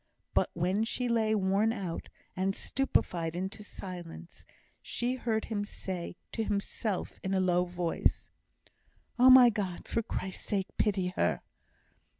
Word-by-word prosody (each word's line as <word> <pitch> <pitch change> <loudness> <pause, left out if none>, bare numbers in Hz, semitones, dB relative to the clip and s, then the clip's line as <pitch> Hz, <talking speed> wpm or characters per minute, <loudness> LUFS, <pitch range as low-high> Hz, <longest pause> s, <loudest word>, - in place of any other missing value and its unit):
But - - +3
when 185 +5 +1
she 245 +2 -1
lay 220 -2 +2
worn 200 +2 +2
out, 190 -7 -4 0.3
and 190 +1 0
stupefied 170 -11 0
into 190 +4 -4
silence, 175 -4 -9 0.4
she 245 +1 -1
heard 230 -4 -1
him 210 -2 -2
say 185 -4 -5 0.2
to 225 - -1
himself, 205 -1 -2
in 195 0 0
a - - +3
low 180 -1 +3
voice: 175 -1 -1 0.9
"Oh, 255 +1 +8
my 255 -2 +9
God! 195 -5 -4
for 230 - 0
Christ's 190 -4 -4
sake, 195 -2 -2
pity 190 -4 +2
her!" 135 - 0
195 Hz, 140 wpm, -31 LUFS, 180-220 Hz, 0.9 s, my